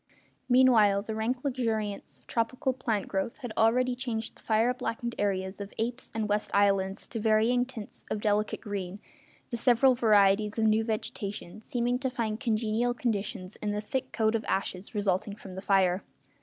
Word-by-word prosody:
Meanwhile 225 -6 +5
the 220 - -4
rank 235 +4 -2
luxuriance 220 - -2
of 125 - -31
tropical 250 +3 -1
plant 225 -5 -2
growth 195 +3 -2
had 245 -6 -6
already 245 +3 +3
changed 230 -3 -4
the - - -21
fire 225 +3 +2
blackened 240 -1 -3
areas 190 -1 -1
of 200 - -8
Apes' 240 +3 -3
and 220 -1 -1
West 210 0 0
Islands 195 -1 +2
to 225 - -4
varying 225 +3 +3
tints 225 -5 -9
of 215 - -1
delicate 210 0 0
green, 200 -2 -5 0.5
the 235 - -1
several 250 +2 +5
varieties 210 -2 +3
of 225 - +2
new 220 0 +3
vegetation 215 -3 -4
seeming 245 0 -1
to 265 0 -1
find 225 -3 -2
congenial 230 0 0
conditions 205 -5 -3
in 210 -1 -2
the 210 - -1
thick 255 +5 -3
coat 220 -1 +1
of 225 -1 0
ashes 190 +1 -3
resulting 200 0 0
from 195 -3 -11
the 190 - -6
fire. 190 -1 +2
220 Hz, 170 wpm, -29 LUFS, 205-240 Hz, 0.5 s, Meanwhile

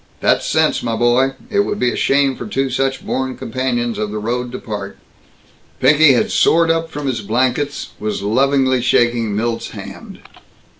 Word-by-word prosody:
"That's - - +1
sense, - - +2
my 115 -1 -2
boy. 120 +3 +2 0.2
It 200 - +1
would 205 0 0
be 125 -10 +1
a - - -4
shame 140 -1 +2
for 120 - -7
two 135 +4 -1
such 135 +1 -1
born 130 0 -2
companions 120 -2 -2
of 105 -1 -2
the 105 - -5
road 120 +3 -3
to - - -3
part!" 100 -3 -6 0.8
Pinky 145 +2 +5
had 120 - +1
soared 165 0 +3
up 165 0 -1
from 145 -2 -6
his 125 -5 -2
blankets; 130 +7 -1
was 105 -1 -3
lovingly 130 +3 +2
shaking 120 -3 +1
Milt's 115 +2 -2
hand. - - -10
125 Hz, 170 wpm, -18 LUFS, 115-135 Hz, 0.8 s, Pinky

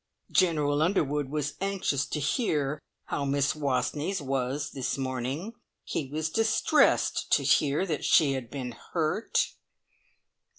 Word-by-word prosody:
"General 150 -5 +2
Underwood 150 -5 +1
was 150 0 -2
anxious 190 -8 0
to 150 - -3
hear 150 - 0 0.2
how 145 - -3
Miss 140 0 +1
Wastneys 145 +5 -1
was 135 0 -2
this 135 -1 -2
morning. 135 - -3 0.3
He 140 - -3
was 155 +1 -2
distressed 225 - +2
to - - +4
hear 150 +5 +3
that 155 -6 -3
she 145 -4 +4
had 130 -4 -4
been 130 -3 -5 0.2
hurt." 165 +6 +1
145 Hz, 125 wpm, -28 LUFS, 135-160 Hz, 0.3 s, to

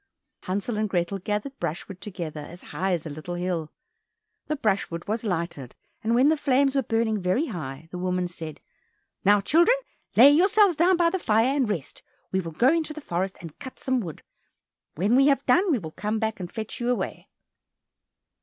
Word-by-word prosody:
Hansel 205 +4 -2
and 215 -1 0
Grethel 180 +1 -1
gathered 210 +8 -3
brushwood 180 +4 -5
together, 170 -6 -6
as 170 +4 -10
high 190 +1 0
as 170 -2 -2
a - - -4
little 155 +4 -6
hill. 175 -3 -2 0.8
The 305 - 0
brushwood 195 - -1
was 220 +2 -1
lighted, 170 - -3 0.3
and 230 +2 +2
when 260 +4 +5
the 315 - +3
flames 275 -1 +2
were 275 - +2
burning 225 -3 0
very 185 - +1
high, 155 - -6
the 180 - -5
woman 180 0 0
said, 165 -3 -8 0.6
"Now, 205 +1 +5
children, 345 - +4 0.4
lay 265 +5 +9
yourselves 385 +4 +5
down 350 +4 +4
by 340 -1 +3
the 380 - -1
fire 225 +1 +2
and 260 -6 +1
rest, 165 -9 -4 0.3
we 190 - +1
will 165 -3 -4
go 250 - +4
into 320 -2 -1
the 310 - -7
forest 185 - -3
and 165 -3 -10
cut 260 -2 -9
some 260 -1 0
wood. 170 -9 -7 0.7
When 200 +9 +2
we 275 +2 +6
have 275 -1 +2
done, 365 +1 +4
we 280 - +3
will 160 -7 -7
come 210 +6 -2
back 220 -1 -2
and 175 -2 -6
fetch 220 -2 -5
you 240 0 -1
away." 250 - -2
210 Hz, 190 wpm, -26 LUFS, 175-270 Hz, 0.8 s, lay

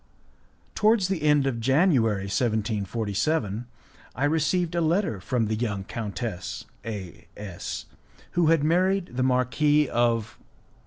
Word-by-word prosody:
Towards 215 -3 +3
the 190 -3 -1
end 150 -2 +3
of 130 -4 -1
January, 125 - +3
1747, 110 - -1 0.5
I 135 - 0
received 160 +3 +1
a 170 - +1
letter 165 - +1
from 115 +3 0
the 110 - -1
young 105 -3 -2
countess 100 - -5 0.2
A 100 -6 -7
S, 100 -4 -6 0.5
who 175 -2 +2
had 160 -2 +4
married 185 +4 +2
the 130 - 0
Marquis 130 +4 +2
of 115 -3 0
125 Hz, 120 wpm, -26 LUFS, 105-160 Hz, 0.5 s, had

